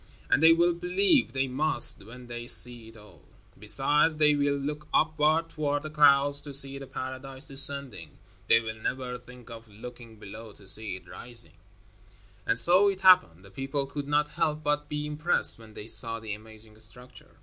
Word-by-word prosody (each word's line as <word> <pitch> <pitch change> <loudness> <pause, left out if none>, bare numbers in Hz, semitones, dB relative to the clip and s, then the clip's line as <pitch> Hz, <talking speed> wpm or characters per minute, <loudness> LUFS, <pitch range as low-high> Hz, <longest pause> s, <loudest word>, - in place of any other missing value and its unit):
And - - +2
they 160 +1 +6
will 170 +1 +1
believe; 185 - -1
they 135 0 -2
must, 130 -5 +4
when 125 +4 -14
they 120 0 -9
see 120 -2 +3
it 115 0 -16
all. 105 -1 -19 0.4
Besides, 145 +8 +1
they 150 -1 +2
will 145 0 -1
look 150 +2 -7
upward, 155 +1 0
toward 145 -2 -4
the 155 - -9
clouds, 145 -1 +4
to 145 -2 -2
see 140 0 +1
the 135 - -11
paradise 130 +1 -4
descending. 135 - -1 0.3
They - - +4
will 110 -1 -7
never 125 +2 -6
think 125 -1 -17
of 115 0 -13
looking 115 +2 -14
below 110 +1 -13
to 100 - -19
see 105 -1 0
it 90 -1 -15
rising." 120 +4 -7 0.9
And 115 - 0
so 180 +10 +4
it 190 -1 -6
happened. 180 - +3
The 100 - -17
people 135 +2 -5
could 140 +1 -8
not 150 0 -1
help 155 0 -3
but 150 0 -3
be 150 0 -5
impressed 150 -2 +3
when 110 -1 -17
they 105 - -10
saw 115 0 +5
the 110 -2 -8
amazing 110 0 -15
structure. 125 +3 -7
135 Hz, 180 wpm, -26 LUFS, 115-150 Hz, 0.9 s, they